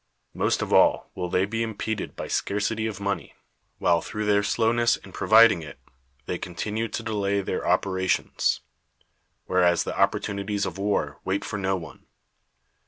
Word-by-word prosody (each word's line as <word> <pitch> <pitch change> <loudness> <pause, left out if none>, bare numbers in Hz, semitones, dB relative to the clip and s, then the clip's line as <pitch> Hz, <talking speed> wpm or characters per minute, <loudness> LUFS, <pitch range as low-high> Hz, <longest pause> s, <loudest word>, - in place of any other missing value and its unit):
Most - - 0
of - - -3
all - - +4
will 90 -1 -4
they 90 +2 +2
be 115 +3 -3
impeded 110 -1 -3
by - - -5
scarcity 110 +2 -1
of 105 -3 -5
money, 100 0 -3 0.4
while, 85 -1 +2
through 105 +4 -4
their 100 -1 +3
slowness 115 +3 +2
in 95 - -14
pro - - -5
viding 110 -5 +7
it, 80 - -10 0.5
they 90 - -3
continue 105 +6 -3
to 115 - -5
delay 100 -3 0
their - - -3
operations; 95 -2 +1 0.8
whereas 90 -2 +3
the - - -4
opportunities 100 0 0
of 95 +1 -5
war 100 +1 -1
wait 95 +1 -1
for 105 - -4
no 95 0 0
one. 85 -3 -9
100 Hz, 160 wpm, -25 LUFS, 95-110 Hz, 0.8 s, viding